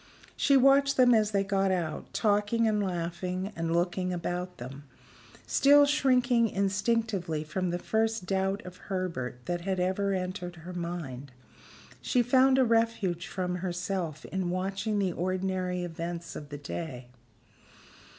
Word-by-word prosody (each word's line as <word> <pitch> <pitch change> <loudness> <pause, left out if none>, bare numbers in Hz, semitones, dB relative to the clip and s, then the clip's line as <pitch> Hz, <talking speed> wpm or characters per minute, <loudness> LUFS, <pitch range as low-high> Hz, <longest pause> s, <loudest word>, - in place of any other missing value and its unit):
She 280 -1 +4
watched 275 +1 +5
them 250 -1 +6
as 215 -2 +3
they 200 -2 +1
got 195 0 +1
out, 170 -4 -3
talking 210 +2 +2
and 210 -1 +1
laughing, 180 +1 -3
and 165 0 -2
looking 180 +2 0
about 180 +1 -3
them. 135 +4 -8 0.6
Still 285 +1 +6
shrinking 250 -5 +3
instinctively 195 -4 0
from 180 +4 -2
the 175 - -1
first 220 +1 0
doubt 195 +1 -1
of 180 0 -9
Herbert 170 - -4
that 175 0 -2
had 190 +1 -2
ever 190 +2 0
entered 180 -1 -4
her 175 +2 -9
mind, 165 -7 -5 0.7
she 250 -2 +2
found 260 +2 +4
a 260 - +5
refuge 225 -6 +1
from 180 -2 -2
herself 180 -3 -3
in 190 -2 -2
watching 195 +4 -1
the 190 -3 0
ordinary 185 0 -1
events 170 0 -5
of 145 - -8
the 145 - -6
day. 140 -4 -6
185 Hz, 140 wpm, -29 LUFS, 175-215 Hz, 0.7 s, them